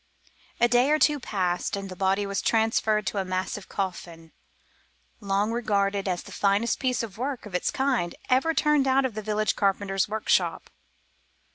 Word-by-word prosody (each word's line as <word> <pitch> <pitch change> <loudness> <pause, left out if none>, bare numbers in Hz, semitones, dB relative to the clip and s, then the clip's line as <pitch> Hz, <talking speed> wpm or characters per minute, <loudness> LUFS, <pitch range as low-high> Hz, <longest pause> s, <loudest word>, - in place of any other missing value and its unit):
A 240 - +5
day 245 +3 +3
or 305 - +4
two 300 -1 +3
passed, 185 -8 -1
and 200 0 -5
the 185 - -8
body 195 +2 +1
was 200 0 -2
transferred 220 -1 +1
to 200 - -1
a - - 0
massive 185 +2 -4
coffin 170 -4 -5 0.9
long 200 +1 0
regarded 200 -4 0
as 180 -2 -2
the - - -12
finest 200 +3 +1
piece 250 -3 0
of 215 -2 -8
work 265 -1 -3
of 210 - -10
its 180 - 0
kind 255 -11 0
ever 290 +6 +2
turned 300 -3 +3
out 265 +1 +3
of 255 - -2
the 215 - -5
village 215 0 0
carpenter's 195 -1 0
workshop. 220 0 0
210 Hz, 170 wpm, -26 LUFS, 195-240 Hz, 0.9 s, A